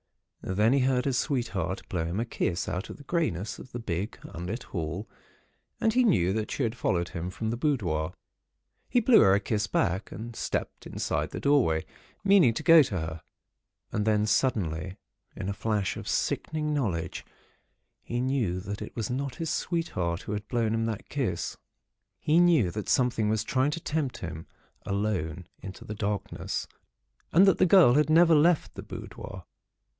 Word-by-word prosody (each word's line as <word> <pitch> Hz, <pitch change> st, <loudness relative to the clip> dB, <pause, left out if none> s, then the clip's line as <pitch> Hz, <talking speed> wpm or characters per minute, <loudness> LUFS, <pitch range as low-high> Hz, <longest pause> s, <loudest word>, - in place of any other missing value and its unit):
Then 105 Hz, +6 st, +2 dB
he 140 Hz, -, +4 dB
heard 125 Hz, -1 st, +2 dB
his 135 Hz, -3 st, +1 dB
sweetheart 105 Hz, -, -2 dB
blow 85 Hz, -3 st, -2 dB
him 85 Hz, +5 st, -2 dB
a 115 Hz, -, 0 dB
kiss 90 Hz, -6 st, -2 dB
out 90 Hz, +1 st, -3 dB
of -, -, -8 dB
the 145 Hz, -, -13 dB
greyness 130 Hz, -, -1 dB
of 130 Hz, -, -11 dB
the -, -, -5 dB
big, 100 Hz, -2 st, -3 dB
unlit 90 Hz, +8 st, -5 dB
hall, 85 Hz, +4 st, -4 dB, 0.7 s
and 225 Hz, -, +2 dB
he 255 Hz, +1 st, +4 dB
knew 95 Hz, -, +3 dB
that 110 Hz, 0 st, -2 dB
she 140 Hz, -, -2 dB
had 115 Hz, -1 st, -1 dB
followed 85 Hz, -7 st, 0 dB
him, 85 Hz, +1 st, -4 dB
from 110 Hz, +4 st, -3 dB
the 120 Hz, -, -2 dB
boudoir. 90 Hz, -, 0 dB, 0.8 s
He 245 Hz, -, +4 dB
blew 235 Hz, 0 st, +6 dB
her 95 Hz, 0 st, +6 dB
a -, -, +3 dB
kiss 105 Hz, 0 st, -1 dB
back, 95 Hz, 0 st, 0 dB
and 115 Hz, +3 st, -7 dB
stepped -, -, -3 dB
inside -, -, -2 dB
the -, -, -6 dB
doorway, 130 Hz, -, +2 dB, 0.4 s
meaning 190 Hz, -, +5 dB
to 160 Hz, -, -3 dB
go 165 Hz, 0 st, +8 dB
to 100 Hz, -, -1 dB
her. 80 Hz, 0 st, -5 dB, 0.7 s
And 105 Hz, -, 0 dB
then, 105 Hz, -1 st, +2 dB
suddenly, 95 Hz, -, 0 dB, 0.4 s
in 95 Hz, -, -5 dB
a 100 Hz, -, -1 dB
flash 105 Hz, -1 st, -1 dB
of -, -, -7 dB
sickening 150 Hz, -1 st, -1 dB
knowledge, 100 Hz, -, -2 dB, 0.8 s
he 120 Hz, -, -3 dB
knew 125 Hz, -8 st, 0 dB
that 100 Hz, +3 st, -6 dB
it 105 Hz, -, -7 dB
was 115 Hz, -1 st, -3 dB
not 135 Hz, +1 st, -3 dB
his 165 Hz, -2 st, -3 dB
sweetheart 90 Hz, -, -2 dB
who -, -, -6 dB
had 105 Hz, 0 st, -4 dB
blown 115 Hz, -2 st, 0 dB
him 115 Hz, 0 st, 0 dB
that 110 Hz, -3 st, -5 dB
kiss. -, -, -2 dB, 0.6 s
He 155 Hz, +3 st, +3 dB
knew 165 Hz, -, +4 dB
that 105 Hz, +1 st, -5 dB
something 120 Hz, -4 st, +2 dB
was 110 Hz, -1 st, +1 dB
trying 130 Hz, +4 st, +1 dB
to 150 Hz, -, -3 dB
tempt 155 Hz, -5 st, -2 dB
him 80 Hz, -2 st, -7 dB, 0.4 s
alone 95 Hz, -5 st, -2 dB
into 95 Hz, 0 st, -9 dB
the 105 Hz, -, -5 dB
darkness, 105 Hz, -1 st, -3 dB, 0.6 s
and 185 Hz, +5 st, +7 dB
that 195 Hz, -, +4 dB
the 185 Hz, -, +5 dB
girl 170 Hz, -9 st, +7 dB
had 150 Hz, +2 st, +3 dB
never 165 Hz, +1 st, +6 dB
left 160 Hz, +2 st, +3 dB
the -, -, -7 dB
boudoir. 95 Hz, -2 st, -8 dB
110 Hz, 180 wpm, -28 LUFS, 95-140 Hz, 0.8 s, go